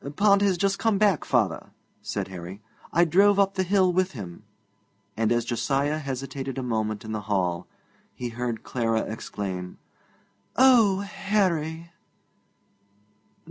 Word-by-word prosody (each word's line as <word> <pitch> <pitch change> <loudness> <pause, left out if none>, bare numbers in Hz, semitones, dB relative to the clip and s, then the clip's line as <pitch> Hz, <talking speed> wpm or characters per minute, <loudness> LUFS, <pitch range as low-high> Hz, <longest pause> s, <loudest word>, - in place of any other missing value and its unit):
'Pond 200 +1 +4
has 195 -3 +2
just 195 +2 0
come 225 -3 +2
back, 200 -5 +3
father,' 110 -10 0 0.3
said - - -4
Harry; 90 +1 -8 0.3
'I 170 +2 +4
drove 200 +5 +4
up 195 -1 +3
the 190 - 0
hill 185 -1 +2
with 185 0 +1
him.' 95 -9 -8 0.7
And 110 +1 +1
as 120 -1 +1
Josiah 140 +5 0
hesitated 135 -1 -5
a 130 - -2
moment 110 -3 -2
in 110 - -6
the 110 -1 -3
hall, 90 -3 0 0.5
he 125 - -4
heard 120 -1 -4
Clara 115 -2 0
exclaim, 95 -4 -5 0.8
'Oh, 230 -7 +5
Harry!' 175 -5 -1
140 Hz, 135 wpm, -26 LUFS, -, 0.8 s, Oh